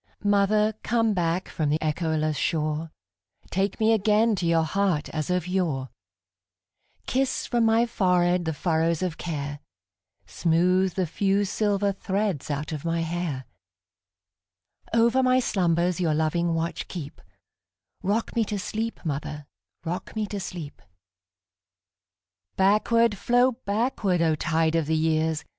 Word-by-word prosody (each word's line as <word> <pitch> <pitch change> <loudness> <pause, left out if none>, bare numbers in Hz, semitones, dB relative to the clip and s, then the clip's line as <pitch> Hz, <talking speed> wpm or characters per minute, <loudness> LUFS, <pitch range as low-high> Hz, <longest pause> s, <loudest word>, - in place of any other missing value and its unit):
Mother, 205 +1 +3
come 225 -1 +1
back 175 0 0
from 155 -2 -2
the 150 - +2
echoless 155 -1 0
shore, 155 +1 -1 0.6
Take 195 +3 -1
me 220 0 +4
again 215 +2 +3
to 175 -1 -1
your 165 -1 +3
heart 180 -2 0
as 155 0 -3
of 180 -1 0
yore; 165 -9 -1 1.2
Kiss 265 +1 0
from 240 -2 +1
my 225 +1 +4
forehead 180 -5 +2
the 160 - -1
furrows 165 +1 0
of 175 -3 -3
care, 145 -3 -4 0.7
Smooth 180 +2 +1
the 185 - +1
few 195 +4 +1
silver 205 0 0
threads 195 -5 -2
out 145 +1 -3
of 150 -3 -5
my 165 0 0
hair; 165 -5 -3 1.5
Over 230 +3 +3
my 255 0 +4
slumbers 175 -6 +1
your 160 -3 +1
loving 165 +2 +1
watch 165 0 -3
keep;—Rock 185 +6 -7
me 230 - +3
to 205 0 -3
sleep, 220 +3 -3
mother,—rock 145 - -6
me 215 -1 -1
to 205 0 -5
sleep! 175 -6 -7 1.7
Backward, 215 +3 +3
flow 245 +2 +3
backward, 210 -5 0
O 160 -1 +3
tide 160 +1 +1
of 165 -3 +1
the 160 0 +1
years! 160 0 0
180 Hz, 130 wpm, -25 LUFS, 160-205 Hz, 1.7 s, me